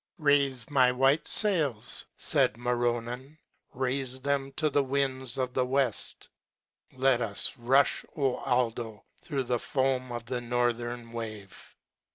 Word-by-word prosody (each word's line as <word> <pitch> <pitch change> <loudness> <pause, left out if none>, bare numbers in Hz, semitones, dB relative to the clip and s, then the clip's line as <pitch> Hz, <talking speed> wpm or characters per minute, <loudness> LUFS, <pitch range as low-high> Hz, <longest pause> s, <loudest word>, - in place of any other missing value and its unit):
Raife 140 -5 +2
my 130 -3 +5
white 135 +4 +2
fails," 155 - +1
faid 110 - +1
Ma 120 +1 -1
ronnan, 120 +4 -2 0.2
" - - -34
raife 130 0 -2
them 140 -1 0
to 155 +3 +1
the 140 0 +3
winds 130 -2 -1
of 130 -1 -1
the 130 - +2
weft. 130 -3 -2 0.7
Let 130 -1 +2
us 105 -4 0
rufli, 130 +4 +2
O 135 -4 +1
Aldo! 115 -3 -1 0.2
through 140 -4 -2
the 120 -1 -1
foam 130 -1 0
of 120 -1 -5
the 125 0 -3
nor 120 0 +1
thern 120 0 -7
wave. 110 -4 -8
125 Hz, 145 wpm, -29 LUFS, 120-135 Hz, 0.7 s, my